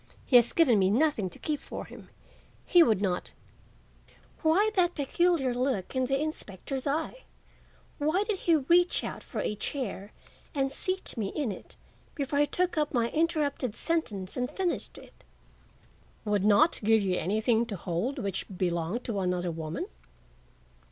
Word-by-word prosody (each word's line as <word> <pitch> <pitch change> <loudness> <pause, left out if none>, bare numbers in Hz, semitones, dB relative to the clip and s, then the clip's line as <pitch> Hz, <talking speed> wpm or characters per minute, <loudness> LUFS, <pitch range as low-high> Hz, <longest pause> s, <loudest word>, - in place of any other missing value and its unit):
"He 255 - +1
has 240 -1 +4
given 255 -11 +4
me 190 -1 +3
nothing 230 -4 +2
to - - -9
keep 300 -2 -2
for - - -7
him. - - -13 0.6
He 350 - +6
would 215 - +4
not—" 180 -2 -2 1.1
Why 370 +7 +3
that 355 -2 +2
peculiar 290 -2 +1
look 250 -4 -1
in 260 0 +2
the 270 +1 0
inspector's 270 - -4
eye? 320 - -2 0.7
Why 310 +7 +2
did 420 -2 -2
he 335 - +3
reach 345 +5 +3
out - - -5
for - - -5
a - - -1
chair 210 -3 -4 0.4
and 270 -1 +1
seat 370 +6 -3
me 215 -3 -1
in 260 +2 -2
it 185 - -8 0.4
before 285 -1 -1
he 290 - +4
took 360 -1 0
up 300 -2 -1
my 235 -1 +1
interrupted 295 -7 0
sentence 215 - -1
and 250 0 -1
finished 370 -3 -2
it? - - -16 1.0
"—would 205 -2 +1
not 250 +11 +5
give 220 0 +4
you 185 -2 0
anything 220 +4 +1
to 210 - -4
hold 185 +9 -2
which 195 -2 -3
had 190 - -11
belonged 175 +5 -1
to 215 -4 -2
another 180 -1 -1
woman? 160 0 -4
255 Hz, 160 wpm, -29 LUFS, 200-315 Hz, 1.1 s, He